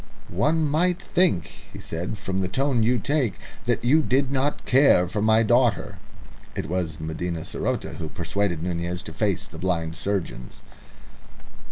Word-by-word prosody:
"One 155 0 +2
might 175 +5 +2
think," 175 - +1 0.2
he - - -9
said, 85 +6 -4
"from 95 -1 -2
the 95 - 0
tone 130 +4 +1
you 120 +3 +3
take, 125 - 0 0.3
that - - +1
you 150 +6 +5
did 135 -1 +1
not 140 +2 -1
care 130 -9 +5
for 105 +4 -2
my 110 +1 +4
daughter." 115 -5 +2 0.6
It - - -3
was 85 -2 -2
Medina 80 +2 -3
saroté - - -3
who 80 -2 -5
persuaded 85 0 -1
Nunez 90 +1 -3
to - - -8
face 100 -2 0
the - - -11
blind 85 -3 -1
surgeons. 85 -13 -4
100 Hz, 155 wpm, -24 LUFS, 85-130 Hz, 0.6 s, you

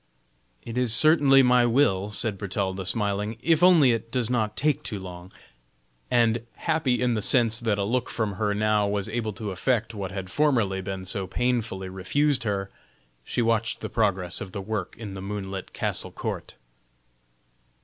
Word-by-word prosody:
"It 120 +1 -4
is 120 -3 +4
certainly 145 -3 +6
my 125 -1 +4
will," 105 -6 +2
said 105 -1 +1
Bertalda, 95 -1 -3
smiling, 105 +1 0
"if 165 -1 +3
only 170 -8 +6
it 115 0 -3
does 125 -1 -1
not 110 -4 -1
take 150 +2 +1
too 110 -8 -4
long." 90 -1 -9 0.8
And, 115 -1 +2
happy 150 -7 0
in 125 -1 +2
the 110 - -1
sense 115 +1 +3
that 110 -4 0
a 100 - 0
look 120 +4 -1
from 110 -3 -2
her 105 -1 0
now 105 -1 +1
was 100 0 -1
able 110 0 -3
to 105 +1 -5
effect 115 +4 -1
what 100 -3 -5
had 95 -1 -6
formerly 115 -10 +1
been 95 -1 -6
so 95 0 -2
painfully 115 -4 -2
refused 125 +9 0
her, 100 -2 -2 0.5
she 120 - -1
watched 115 -1 0
the 110 - -4
progress 95 -6 -1
of 95 -2 -7
the - - -4
work 100 -2 -4
in 110 -4 -7
the 95 - -7
moonlit 95 -1 -6
castle - - -4
court. - - -6
110 Hz, 170 wpm, -25 LUFS, 95-120 Hz, 0.8 s, certainly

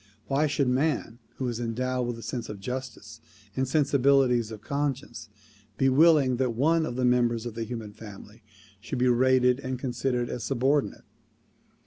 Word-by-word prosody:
Why 145 +3 +1
should 140 -2 0
man 130 -3 0 0.2
who 130 - -2
is 120 -1 -3
endowed 125 +2 -2
with 120 - -3
the 115 - -10
sense 115 +2 -5
of 105 -2 -7
justice 125 +4 -7 0.3
and 130 0 0
sensibilities 135 -4 +3
of 110 -2 -9
conscience 140 -4 -3 0.5
be 135 - +3
willing 140 -3 +4
that 125 -3 0
one 160 +5 +2
of 120 - -5
the 125 0 0
members 120 -2 +2
of 120 - -5
the 115 0 -4
human 110 -3 -7
family 105 +1 -12 0.4
should 100 - -5
be 125 +1 +2
rated 125 +1 +3
and 130 -1 -4
considered 125 -1 -2
as 120 - -5
subordinate? 135 +4 0
125 Hz, 165 wpm, -27 LUFS, 120-135 Hz, 0.5 s, willing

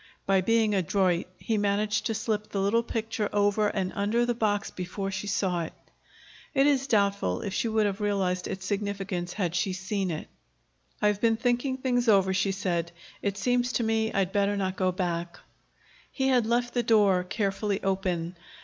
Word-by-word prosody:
By 195 -1 +3
being 225 +2 +2
adroit 185 -1 +1
he 220 -2 -1
managed 205 +1 +1
to 225 - -1
slip 215 -1 -2
the 200 - -2
little 200 +4 +2
picture 225 -2 -2
over 205 +1 +2
and 190 -2 -2
under 215 +4 +1
the 240 - +1
box 210 -3 0
before 190 +2 -4
she 190 +2 -4
saw 185 -3 0
it. 165 - -5 0.8
It 275 - +5
is 275 -2 +2
doubtful 200 - +1
if 195 - -4
she 230 - 0
would 220 -1 +2
have 200 +1 -2
realized 190 -3 0
its 190 0 -5
significance, 195 -3 -3
had 180 -5 -1
she 180 +2 0
seen 190 +1 -2
it. 155 -2 -4 0.8
"I've 210 -1 +2
been 225 -1 +3
thinking 245 +3 0
things 250 -2 0
over," 190 -2 +4
she 195 +1 +1
said. 175 -3 -2 0.3
"It 200 -1 -2
seems 245 +3 +1
to 235 - +1
me 220 0 +1
I'd 195 -1 0
better 200 0 +2
not 190 -1 -1
go 185 -1 +1
back." 175 -2 -3 0.7
He 265 -1 0
had 245 -4 +3
left 240 +1 +1
the 245 - +2
door 205 -5 +4
carefully 200 +1 -1
open. 185 -3 -1
200 Hz, 180 wpm, -27 LUFS, 190-225 Hz, 0.8 s, It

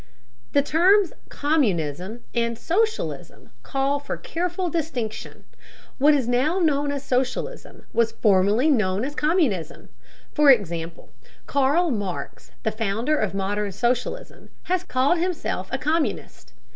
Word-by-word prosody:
The 285 - +4
terms 370 +6 +4 0.2
"communism" 205 - -1
and 235 -1 0
"socialism" 435 - -2
call 275 +1 0
for 285 - -5
careful 355 +2 -3
distinction. 290 -10 -4 0.6
What 295 +2 +6
is 260 -5 0
now 260 +8 +1
known 290 -5 +1
as 285 -1 -4
socialism 265 - -3
was 230 -1 +2
formerly 205 +5 +3
known 210 -3 +1
as 290 - -4
communism. 295 - 0 0.4
For 300 -2 +5
example, 170 -8 +1 0.3
Karl 285 +5 +2
Marx, 185 - -5
the 220 - 0
founder 225 +7 -1
of 205 -2 -1
modern 200 +1 -1
socialism, 245 - -2 0.4
called 270 +7 +2
himself 360 0 -2
a - - 0
communist. 315 +1 -2
265 Hz, 120 wpm, -24 LUFS, 210-315 Hz, 0.6 s, What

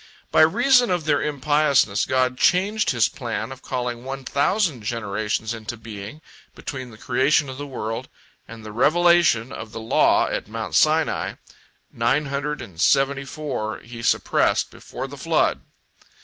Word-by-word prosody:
By - - +5
reason 245 +9 +4
of 175 -4 -1
their 145 -2 +2
impiousness 145 -7 +2
God 130 -1 +1
changed 195 +9 +2
His 120 -5 +3
plan 115 -1 -5
of 130 -1 -10
calling 125 -2 -4
one 135 0 -6
thousand 150 - +1
generations 110 0 -2
into 115 +1 -6
being 110 +5 -9 0.3
between 130 -3 -6
the 110 - -14
creation 135 +5 +1
of 130 +1 -7
the 145 - -5
world 120 -1 -5 0.4
and 115 -1 -11
the 105 - -7
revelation 155 -1 +3
of 110 -5 -8
the - - -5
law 110 +1 +3
at - - -3
Mount 110 0 -5
Sinai; 155 0 +2 0.6
nine 125 +6 +1
hundred 140 +1 -3
and 85 -3 -9
seventy 135 +3 +3
four 135 -7 -4
He 115 0 -10
suppressed - - +1
before - - -7
the - - -10
flood. - - +1
130 Hz, 150 wpm, -23 LUFS, 115-150 Hz, 0.6 s, By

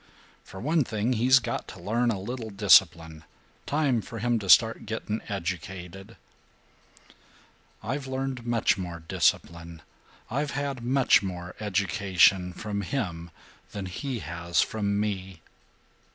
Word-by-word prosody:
"For 95 - -11
one 155 - +1
thing, 110 +1 -1
he's 125 +3 +5
got 120 -2 -3
to - - -10
learn 115 +7 0
a 105 -4 -1
little 115 +3 -5
discipline. 85 -6 +4 0.4
Time 140 -6 +1
for 115 +2 -9
him 120 +1 0
to 100 -3 -7
start 115 +4 +5
getting 110 0 -3
educated." 95 +2 -6 1.7
"I've 135 +5 -3
learned 130 -1 -3
much 115 -4 +1
more 85 -3 -6
discipline, 85 -2 -1 0.5
I've 140 +3 -1
had 140 -3 -3
much 130 +2 +4
more 90 -2 -6
education, 95 -2 +2
from 100 +2 -4
him 85 -7 -4 0.4
than 100 -2 -5
he 125 +8 -4
has 85 +2 -2
from 100 -2 -2
me." 95 -4 -3
105 Hz, 125 wpm, -27 LUFS, 90-120 Hz, 1.7 s, he's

